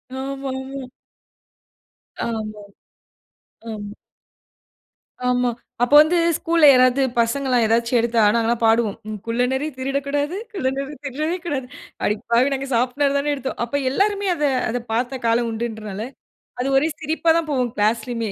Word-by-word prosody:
ஆமா, 270 +1 -4
ஆமா. 265 0 -7 1.4
ஆமாமா. 215 -2 -4 1.1
ஆமா. 205 -1 -7 1.3
ஆமா. 250 0 +2 0.3
அப்ப 245 - 0
வந்து 315 +3 +2 0.2
ஸ்கூல்ல 330 -1 +3
யாராவது 255 +1 +4 0.2
பசங்கெல்லாம் 250 +1 +2
ஏதாச்சி 230 +2 +1
எடுத்தா 230 0 +2
நாங்கெல்லாம் 230 0 +1
பாடுவோம். 225 -2 +2 0.3
"குள்ளநரி 250 +5 0
திருடக்கூடாது, 280 +4 -1 0.2
குள்ளநரி 275 -4 -2
திருடவே 305 +6 -2
கூடாது". 270 -6 -3 0.4
"அடிப்பாவி 235 +6 +1
நாங்க 275 0 -3
சாப்புட 250 +4 +1
தானே 290 +1 0
எடுத்தோம்." 270 -1 -4
அப்ப 285 +4 -1
எல்லாருமே 400 +7 +1
அத, 300 - -3 0.3
அத 245 +2 -1
பார்த்த 245 +3 -1
காலம் 230 +1 +2
உண்டுன்றனால, 220 -3 -5 0.6
அது 260 - 0
ஒரே 300 +4 +2
சிரிப்பா 320 +2 0
தான் 330 -2 -1
போகும். 255 -3 0
கிளாஸ்லயுமே 225 +2 0
255 Hz, 120 wpm, -21 LUFS, 230-280 Hz, 1.4 s, யாராவது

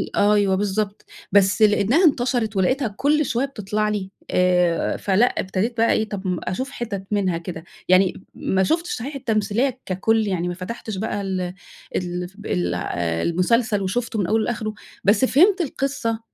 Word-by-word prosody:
أ 205 +1 +4
أيوه 200 -2 +3
بالضبط، 205 +1 -2 0.3
بس 200 +1 +4
لأنها 215 - +4
انتشرِت 245 -6 +1
ولقيتها 255 +7 +2
كلّ 300 +2 +2
شوية 245 +2 0
بتطلَع 210 -4 -2
لي 195 -2 -3 0.2
آآ، 180 -2 +2
فلأ 200 +4 +3
ابتديت 210 +2 -2
بقى 230 +1 +3
إيه، 220 0 0
طَب 190 -3 -3
أشوف 260 +10 -3
حِتَت 205 -7 -5
منها 190 -5 +1
كده، 165 -1 -7 0.3
يعني 185 0 +3
ما 190 0 0
شوفتش 340 - 0
صحيح 275 +5 -6
التمثيلية 230 +2 0
ككُل 215 +4 +1
يعني 180 -3 -1
ما 175 - -2
فتحتِش 195 +3 -6
بقى 205 0 -2
ال 190 -1 -2 0.5
ال 180 0 -2 0.2
ال 90 0 -1 0.5
المسلسل 205 +4 +1
وشُفته 220 +4 -2
من 190 - 0
أوله 220 +3 +2
لآخرُه 215 -2 -3 0.3
بس 210 +6 +4
فهِمت 365 +9 +4
القصة 265 -7 -2
210 Hz, 155 wpm, -22 LUFS, 190-240 Hz, 0.5 s, أ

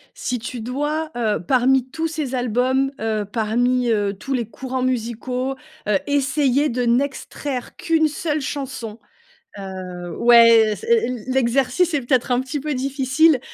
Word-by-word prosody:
Si 250 -1 -3
tu 235 +1 -6
dois, 295 +6 -2
heu, 215 -6 0
parmi 255 +6 +2
tous 325 +3 -2
ces 305 -5 -4
albums, 255 +2 +1
heu, 215 -2 -1
parmi, 245 +3 +1
heu, 205 -2 +1
tous 270 +8 -5
les 235 -4 -1
courants 260 +4 -4
musicaux, 250 +1 -2 0.3
heu, 205 - +3
essayer 285 0 +2
de 250 0 -1
n'extraire 265 +1 -2
qu'1 320 -2 +2
seule 305 0 -2
chanson, 260 -6 -5 0.6
heu, 185 -2 -7
ouais, 230 -2 +6
c - - -10 0.4
l'exercice 265 +6 +1
est 290 - +1
peut-être 250 0 +1
un 245 - +3
petit 265 +3 -4
peu 300 +2 -3
difficile. 275 +3 +2
255 Hz, 140 wpm, -21 LUFS, 230-275 Hz, 0.6 s, ouais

